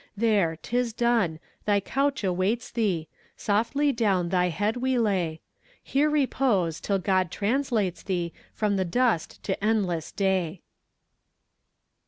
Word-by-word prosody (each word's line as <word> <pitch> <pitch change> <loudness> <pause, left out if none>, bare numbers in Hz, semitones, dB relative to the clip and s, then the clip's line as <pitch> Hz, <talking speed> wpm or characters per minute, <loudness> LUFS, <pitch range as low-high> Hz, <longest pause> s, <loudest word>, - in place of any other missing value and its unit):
There, 205 -7 +2
'tis 240 +4 -1
done! 230 -9 +1 0.3
thy 205 -1 +4
couch 275 +6 -1
awaits 195 +6 0
thee! 190 -9 0 0.3
Softly 235 +8 +1
down 195 -8 +1
thy 180 0 +2
head 205 +7 -1
we 260 +1 0
lay; 185 -8 0 0.4
Here 290 +3 +2
repose, 250 - +1
till 200 - 0
God 185 -1 +1
translates 210 - 0
thee 175 -4 -2 0.2
From 210 -2 0
the 190 - +1
dust 225 -1 0
to 195 0 -3
endless 190 -7 0
day! 190 -3 0
205 Hz, 125 wpm, -26 LUFS, 180-240 Hz, 0.4 s, thy